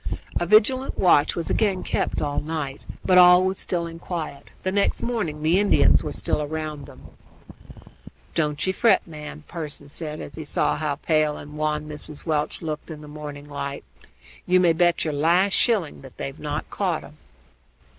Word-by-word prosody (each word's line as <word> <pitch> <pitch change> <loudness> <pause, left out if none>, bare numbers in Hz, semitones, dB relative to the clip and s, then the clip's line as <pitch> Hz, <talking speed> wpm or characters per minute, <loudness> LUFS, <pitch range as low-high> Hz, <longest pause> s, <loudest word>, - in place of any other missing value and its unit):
A 175 - -1
vigilant 255 +7 +3
watch 150 -5 +4
was 170 - -3
again 195 -4 +1
kept - - -1
up - - 0
all 145 - -1
night, 150 -3 -4 0.2
but 180 -1 +6
all 180 0 +8
was 190 0 0
still 175 -2 0
and 165 0 -9
quiet. 155 -5 -5
The 185 - 0
next 200 +1 +1
morning 180 -11 -2
the 165 +4 +4
Indians 205 0 +4
were - - -3
still 150 - -1
round 155 -1 -5
them. - - -14 1.2
"Don't 150 -3 0
ye 190 - +1
fret, 230 +4 +3
ma'am!" 150 -2 -9
Pearson 150 -4 -7
said, 155 0 -5
as 140 - -8
he 160 - -6
saw 145 - 0
how 150 -1 -1
pale 155 0 +1
and 150 +1 -10
wan 150 0 -1
Mrs. 150 0 -7
Welch 155 0 -1
looked 155 0 -4
in 155 -2 -8
the 150 - -11
morning 145 -1 -8
light. 140 -1 -5 0.6
"You 185 0 +5
may 175 -2 +4
bet 175 +1 +2
your 155 - -1
last 175 +7 +3
shilling 205 - +1
that 135 -2 -13
they're 135 - -4
not 150 0 -5
caught 180 -6 -1
'em." 150 - -14
155 Hz, 185 wpm, -24 LUFS, 150-180 Hz, 1.2 s, all